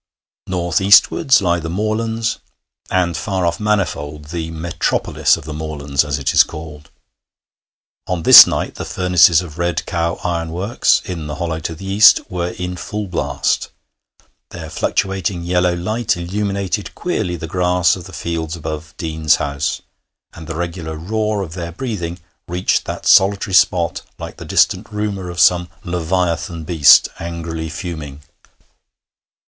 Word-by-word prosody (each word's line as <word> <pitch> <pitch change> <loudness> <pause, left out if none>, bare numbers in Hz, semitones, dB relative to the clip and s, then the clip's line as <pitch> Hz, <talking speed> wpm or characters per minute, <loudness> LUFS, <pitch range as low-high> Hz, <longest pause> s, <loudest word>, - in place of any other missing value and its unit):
North 90 -1 -1
eastwards 100 +6 +5
lie 85 -1 +1
the 80 0 -5
moorlands, 110 +4 -2 0.5
and 90 -2 0
far 95 -2 -2
off 85 0 -1
Manifold, 75 -8 -2
the 80 -1 -4
'metropolis 80 +1 0
of - - -11
the 80 - -6
moorlands,' 75 -2 -2
as 75 -1 -2
it 70 - -1
is - - +7
called. 75 -2 -10 1.2
On 90 -3 -2
this - - +11
night - - -2
the - - -6
furnaces 90 -2 +3
of 80 -1 -11
Red 85 -1 -1
Cow 85 -1 -1
Ironworks, 85 +6 0
in 85 -5 -5
the 75 - -5
hollow 80 0 -3
to 80 0 -5
the 95 - -10
east, 100 +2 +6
were 90 -1 -2
in 90 0 -5
full 105 +2 -5
blast; 90 -3 -1 0.8
their - - -9
fluctuating 95 -2 -1
yellow 90 0 +1
light 105 +4 -1
illuminated 100 +2 -3
queerly 110 - -2
the 80 - -6
grass 90 -1 +1
of 90 -3 -10
the 95 - -11
fields 80 -1 -4
above 80 0 -7
Deane's 80 -1 +1
house, 70 0 -3 0.5
and 80 - -11
the 80 - -5
regular 85 -1 -4
roar 105 +4 -2
of 80 -4 -8
their 85 -1 -5
breathing 90 -5 -5 0.3
reached 90 +2 0
that - - -6
solitary 95 0 +4
spot 85 -3 +2 0.2
like - - -8
the - - -9
distant 95 +4 +2
rumour 105 -3 -3
of 85 0 -6
some 90 +1 +4
leviathan 85 -1 -2
beast 75 -4 +6
angrily 85 -1 -5
fuming. 80 -4 -7
85 Hz, 145 wpm, -18 LUFS, 80-95 Hz, 1.2 s, this